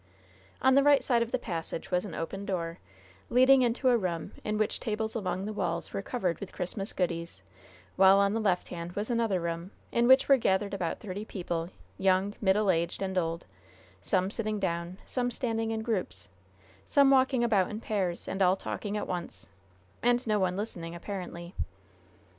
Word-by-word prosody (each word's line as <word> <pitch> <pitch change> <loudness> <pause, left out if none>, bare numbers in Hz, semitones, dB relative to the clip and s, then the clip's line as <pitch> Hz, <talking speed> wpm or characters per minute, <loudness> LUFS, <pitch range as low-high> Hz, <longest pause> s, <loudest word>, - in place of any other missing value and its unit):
On 265 0 +6
the 275 - +6
right 285 0 +5
side 240 -3 +2
of 235 0 -1
the - - +2
passage 170 -7 -5
was 180 +2 +1
an 175 -6 -7
open 195 +4 -4
door, 170 -4 -3 0.5
leading 260 +2 +6
into 250 +2 +2
a 245 - +5
room 175 -6 -3
in 215 0 -1
which 215 -1 0
tables 220 -1 -2
along 195 -3 -2
the 215 - -4
walls - - -2
were - - -2
covered 190 -7 -2
with 200 - -7
Christmas 195 +3 -3
goodies; 170 - -3 0.5
while 190 +1 +7
on 200 0 +3
the 225 - 0
left 190 -5 0
hand 170 0 -6
was 210 +5 -3
another 230 -5 +1
room, 170 +1 -3 0.2
in 235 0 +2
which 260 +1 +6
were 275 - +7
gathered 200 -3 +1
about 180 -4 -2
thirty 205 -1 -5
people, 175 -5 -4 0.3
young, 190 +1 +2
middle 200 0 +3
aged 170 +2 -1
and 190 -1 -3
old 170 -1 -1 0.6
some 185 +2 +1
sitting 215 -2 -2
down, 170 -1 -2
some 245 -1 -1
standing 225 -2 -2
in 220 0 -2
groups, 175 - -3 0.5
some 280 -1 +4
walking 260 -2 +4
about 205 -6 +3
in 215 - -5
pairs, 190 -6 -2
and 190 - -3
all 185 0 +5
talking 205 +1 -4
at - - -2
once, 175 -2 -5 0.5
and 245 +1 +2
no 215 -2 +1
one 185 -1 0
listening, 170 -5 -5
apparently. 175 -1 -6
200 Hz, 180 wpm, -29 LUFS, 180-225 Hz, 0.6 s, while